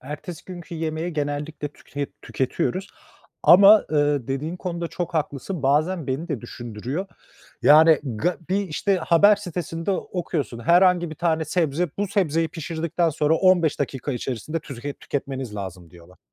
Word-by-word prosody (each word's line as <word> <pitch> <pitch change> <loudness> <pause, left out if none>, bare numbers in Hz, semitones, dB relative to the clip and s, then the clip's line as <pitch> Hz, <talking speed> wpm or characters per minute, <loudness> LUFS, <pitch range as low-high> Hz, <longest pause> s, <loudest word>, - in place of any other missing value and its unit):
Ertesi 150 +4 -8
günkü 175 -2 -9
yemeği 160 +1 -3
genellikle 145 0 -3
tüke 145 -1 -6 0.2
tüketiyoruz 135 +7 -2 0.5
ama, 200 +4 +8
ııı, 145 -4 +1
dediğin 150 +6 -3
konuda 170 -2 -4
çok 175 -1 -5
haklısın, 150 +2 -3
bazen 155 +4 +1
beni 135 +6 -3
de 140 -7 -3
düşündürüyor. 120 - -5 0.6
Yani, 160 +1 +7 0.2
ga 175 +9 0
bir 195 +2 +2
işte 195 +5 0
haber 180 +5 +5
sitesinde 175 -2 -4
okuyorsun 165 - -3
herhangi 175 +4 +4
bir - - -6
tane 160 -1 0
sebze, 165 -1 0
bu 205 -1 0
sebzeyi 165 -5 +1
pişirdikten 165 +1 -2
sonra 155 +1 +1
15 175 -5 +3
dakika 140 0 -2
içerisinde 130 +6 -4
tuzket 140 0 -7
tüketmeniz 135 -5 -4
lazım 90 -4 -7
diyorlar. 90 +1 -17
160 Hz, 140 wpm, -23 LUFS, 140-175 Hz, 0.6 s, ama